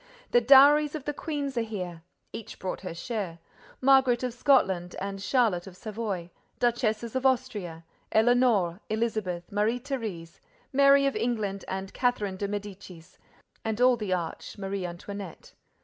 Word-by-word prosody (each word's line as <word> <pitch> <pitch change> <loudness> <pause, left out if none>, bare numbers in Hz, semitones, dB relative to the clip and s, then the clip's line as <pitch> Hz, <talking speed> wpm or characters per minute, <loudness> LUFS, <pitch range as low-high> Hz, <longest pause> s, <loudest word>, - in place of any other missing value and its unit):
The 240 - +5
dowries 285 +4 +7
of 295 -3 -6
the 295 - -2
queens 285 -3 -4
are - - +1
here. 180 -7 -5 0.3
Each 225 -1 -8
brought 185 - -4
her 185 -3 -6
share: 190 -3 -4 0.4
Margaret 260 -2 +4
of 250 -2 -2
Scotland 190 -10 +2
and 195 0 -5
Charlotte 205 -7 +1
of 185 -1 -11
Savoy; 205 -6 -4 0.3
duchesses 235 -1 0
of 260 - 0
Austria: 220 -11 -1 0.3
Éléonore, 220 -6 +3
Elisabeth, 215 -6 -2
Marie 210 +4 +1
Thérèse, 220 - -5 0.3
Mary 275 +1 +6
of 275 - 0
England 215 -5 -2
and 190 +1 -5
Catherine 210 -6 0
de 200 - -2
Médicis; 195 -4 -8 0.4
and 220 0 -2
all 250 0 +5
the 210 -5 -4
arch—Marie 185 +2 -3
Antoinette. 185 +1 -8
215 Hz, 140 wpm, -27 LUFS, 190-250 Hz, 0.4 s, dowries